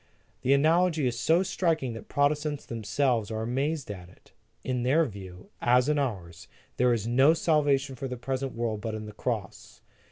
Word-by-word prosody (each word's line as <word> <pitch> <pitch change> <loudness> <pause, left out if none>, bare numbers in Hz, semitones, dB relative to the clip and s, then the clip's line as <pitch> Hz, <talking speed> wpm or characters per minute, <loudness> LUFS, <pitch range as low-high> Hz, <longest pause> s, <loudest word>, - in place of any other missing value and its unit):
The 135 - +3
analogy 160 +1 +3
is 120 -1 -1
so 165 +9 +3
striking 165 -9 0
that 115 - -9
Protestants 145 +1 0
themselves 115 0 -1
are 110 0 -3
amazed 135 +2 -2
at 90 -3 -9
it. - - -22 0.3
In 125 -1 -2
their 145 +7 +3
view, 95 -6 -10
as 125 +2 +4
in 150 -1 +2
ours, 95 -11 -4 0.3
there 125 0 +3
is 115 -3 0
no 135 +7 +4
salvation 145 -4 +1
for 135 +2 -5
the 125 -1 -5
present 130 +1 -3
world 115 -3 -2
but 110 -1 -4
in 110 0 -6
the 105 - -9
Cross. 110 -2 -5
125 Hz, 180 wpm, -28 LUFS, 110-145 Hz, 0.3 s, as